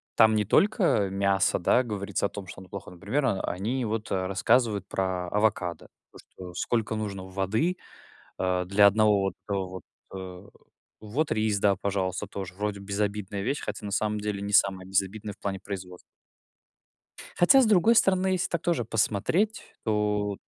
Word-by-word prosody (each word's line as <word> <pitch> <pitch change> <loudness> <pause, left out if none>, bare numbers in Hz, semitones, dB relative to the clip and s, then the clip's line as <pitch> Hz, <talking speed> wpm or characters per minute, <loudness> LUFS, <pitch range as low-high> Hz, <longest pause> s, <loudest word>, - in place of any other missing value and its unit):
там 110 -1 +6
не 105 - +2
только 180 - +3
мясо, 100 0 +2
да, 120 +8 +3
говорится 100 -4 -2
о - - 0
том, 100 -2 -8
что 95 - -10
оно- 95 - -14
плохо. 100 - -8
Например, 100 +11 -2
а, 100 -6 0
они 115 +8 -2
вот, 110 -1 -3
а, 95 -1 0
рассказывают 105 0 +1
про 95 -2 -2
авокадо. 100 -4 0 0.2
То - - -15
что 90 -1 -12
сколько 110 +3 -1
нужно 100 -3 -4
воды, 105 - -1 0.6
а, 90 -1 0
для 100 +2 +6
1 105 0 +4
вот, 95 -2 -1
э, - - 0
вот, 95 -1 -4 0.3
э 95 +1 -8 0.5
Вот 130 +9 -2
рис, 110 -2 +1
да, 100 0 +3
пожалуйста, 95 -1 -2
тоже 95 -3 -6
вроде 105 0 -3
безобидная 100 0 -3
вещь, 135 +6 -1
хотя, - - -5
на 100 - -5
самом 105 +1 0
деле, 105 -1 -3
не 100 +1 -4
самая 95 -2 +3
безобидная 100 +2 -1
в - - -23
плане 95 -1 -3
производства. 95 -3 -7 1.4
Хотя, 220 +10 +6
с - - +4
другой 215 +2 +4
стороны, 190 -3 +3
если 185 -1 +1
так 170 - -2
тоже 170 -10 0
посмотреть, 115 - 0 0.2
то 105 -1 0
от - - -24
100 Hz, 170 wpm, -27 LUFS, 95-110 Hz, 1.4 s, там